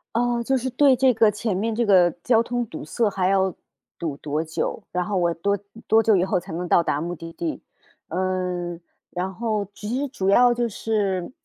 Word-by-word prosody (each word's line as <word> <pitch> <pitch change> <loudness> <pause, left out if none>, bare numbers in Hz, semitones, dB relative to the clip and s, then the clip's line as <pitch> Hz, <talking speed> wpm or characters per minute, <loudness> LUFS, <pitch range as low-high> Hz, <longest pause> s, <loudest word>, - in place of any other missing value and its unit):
哦， 240 0 +1
就 265 +2 +1
是 260 +1 -2
对 270 +1 +5
这 260 0 +4
个 220 -1 +4
前 210 -1 -2
面 220 +4 -1
这 235 +1 0
个 185 -4 +5
交 230 -2 +4
通 245 0 -2
堵 160 - -8
塞 210 +8 0
还 190 -1 0
要 190 -1 +2 0.4
堵 155 -4 -4
多 150 +2 -2
久， 165 +6 -3
然 180 0 -1
后 205 0 -2
我 175 -2 +2
多 200 +5 0
嗯， 205 +3 -14
多 225 0 +5
久 220 -2 +4
以 180 - +2
后 190 -1 +1
才 180 +1 -11
能 175 +2 -3
到 170 - +4
达 145 - 0
目 175 +3 -4
的 165 +1 -9
地。 165 -1 -4 0.5
呃， 180 -1 -2 0.3
然 185 +2 -3
后 215 0 -1
其 210 - -8
实 285 - -1
主 190 -7 -3
要 245 +4 +6
就 240 0 0
是， 200 -3 -1
195 Hz, 230 characters per minute, -23 LUFS, 175-230 Hz, 0.5 s, 要